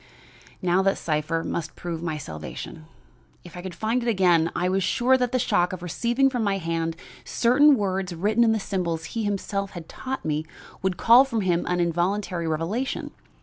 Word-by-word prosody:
Now, 180 +1 +3
that 195 0 +2
cipher 160 +1 -1
must 160 -2 -4
prove 170 -2 -5
my 160 -3 -3
salvation. 145 - -8 0.6
If 175 - -12
I 175 - -6
could 180 -1 -7
find 225 +7 0
it 240 - -1
again 175 -6 +3
I 175 +2 0
was 190 +1 +1
sure 250 +7 +3
that 250 -2 0
the 255 - +2
shock 200 -7 +1
of 180 -1 -6
receiving 235 +9 +1
from 250 -4 -1
my 200 -2 +1
hand 165 -2 -2 0.3
certain 280 +5 +4
words 190 -2 -1
written 210 +7 +2
in 225 - +4
the 220 - +1
symbols 175 -5 -2
he 225 -2 -1
had - - +1
himself 195 -1 -4
taught 265 -6 -6
me 155 0 -1 0.4
would 190 -2 -1
call 235 +7 +7
from 235 -5 -2
him 175 -3 0
an 180 0 0
involuntary 175 +1 0
revelation. 170 +12 -2
185 Hz, 190 wpm, -25 LUFS, 170-225 Hz, 0.6 s, call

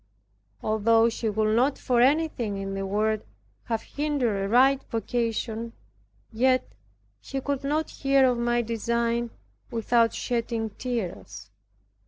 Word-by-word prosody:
Although 225 +1 +3
he 230 -1 0
would 215 +1 +1
not 260 +4 +2
for 245 -2 +1
anything 260 -7 +1
in 195 0 -4
the 195 0 -3
world 215 +2 0 0.4
have 225 -1 -2
hindered 260 -9 -1
a - - -3
right 265 +4 +5
vocation, 230 0 -2 0.6
yet 255 +3 +2 0.5
he 270 - -5
could 280 0 -3
not 300 +3 -1
hear 275 -1 +3
of 250 -2 +2
my 240 0 +1
design 235 +1 -1 0.4
without 230 0 +2
shedding 230 -2 -2
tears. 205 - -5
235 Hz, 125 wpm, -26 LUFS, 220-255 Hz, 0.6 s, right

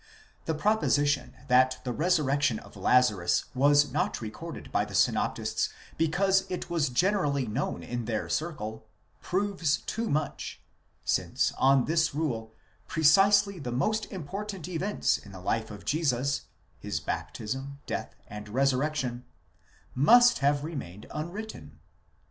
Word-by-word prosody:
The 160 - -1
proposition, 145 -7 +1
that 130 0 +4
the 125 - -2
resurrection 145 -5 +2
of - - -13
Lazarus 100 -3 +3
was 145 +1 +4
not 180 +9 -1
recorded 155 +9 -8
by - - +2
the - - -7
synoptists - - +1 0.3
because 190 +4 +2
it 180 -1 -5
was 160 -5 +1
generally 145 -2 +1
known 120 +6 -3
in 120 -1 -4
their 110 -1 -2
circle, 110 -9 -4 0.3
proves 185 -5 0
too 230 0 -4
much; 150 0 -2 0.5
since - - +1
on 135 -1 +4
this 160 -3 +1
rule, 115 -8 -2 0.4
precisely 195 +4 +4
the 125 -5 -5
most 215 - 0
important 190 +1 -5
events 185 +4 0
in 100 - -14
the 95 - -9
life 110 +4 -1
of 105 -2 -10
Jesus, 140 -3 0 0.3
his - - -3
baptism, 135 +5 -4
death, - - -4
and 105 0 -8
resurrection, 130 0 0 0.7
must 240 - +6
have 145 +1 +2
remained 130 - -6
unwritten. 185 +8 -6
145 Hz, 125 wpm, -28 LUFS, 125-175 Hz, 0.7 s, must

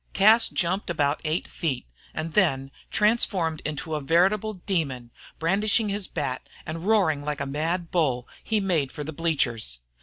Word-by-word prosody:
Cas 220 +4 +6
jumped 185 +3 0
about 145 -3 +1
eight 160 +2 -1
feet, 145 -7 -2 0.3
and 155 +1 -4
then, 135 -9 +2 0.2
transformed 195 -7 +2
into 155 +1 -3
a 150 - -1
veritable 190 +8 +2
demon, 150 - -2 0.3
brandishing 205 +5 +2
his 200 -1 -2
bat 135 -5 -4 0.2
and 165 +4 -5
roaring 185 -10 +3
like 145 -1 -2
mad 165 +5 -2
bull, 135 -8 +1 0.2
he 220 -1 +1
made 170 -9 +1
for 150 - -5
the 155 +2 -6
bleachers. 130 - 0
165 Hz, 150 wpm, -26 LUFS, 145-195 Hz, 0.3 s, Cas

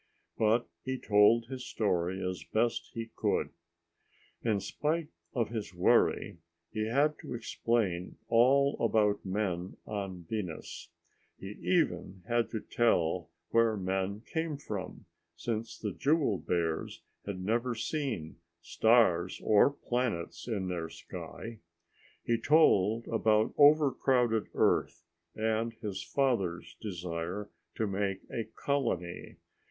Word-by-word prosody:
But 115 +2 +2 0.2
he 130 0 -2
told 105 +1 +4
his 130 +1 -6
story 95 -4 -1
as 90 -5 -4
best 115 +2 0
he 115 -1 -5
could. - - 0 0.9
In 110 -3 +1
spite 150 - -2 0.3
of 115 -2 +1
his 110 -6 -5
worry, 90 -1 +2 0.3
he 110 0 -1
had 145 +5 +2
to 125 - -6
explain 110 -6 -1
all 135 +4 +4
about 105 -3 +2
men 95 -2 -2
on 95 -4 -5
Venus. 95 -7 -5 0.5
He 95 - -7
even 100 - 0
had 120 -1 +1
to 110 - -4
tell 90 -7 +1 0.2
where 115 -2 +3
men 95 +2 -2
came 160 +2 -3
from, 100 -9 -6 0.3
since 110 +5 -3
the 105 - -3
jewel 145 - +2
bears 85 -2 -2 0.2
had 100 -2 -4
never 115 +6 0
seen 115 - -3 0.2
stars 95 -3 +3
or 105 +4 +6
planets 120 -11 -3
in 100 -6 -2
their 85 -3 -3
sky. 115 +6 -8 0.6
He 115 -1 +1
told 115 -8 +4
about 110 -1 +2
overcrowded 135 -6 +4
Earth 85 0 +2 0.3
and 110 +1 0
his 100 -4 -5
father's 95 -11 -1
desire 90 +1 -4 0.2
to 110 - 0
make 100 -1 -1
a 115 - -2
colony. 110 -7 -2
110 Hz, 115 wpm, -31 LUFS, 95-120 Hz, 0.9 s, or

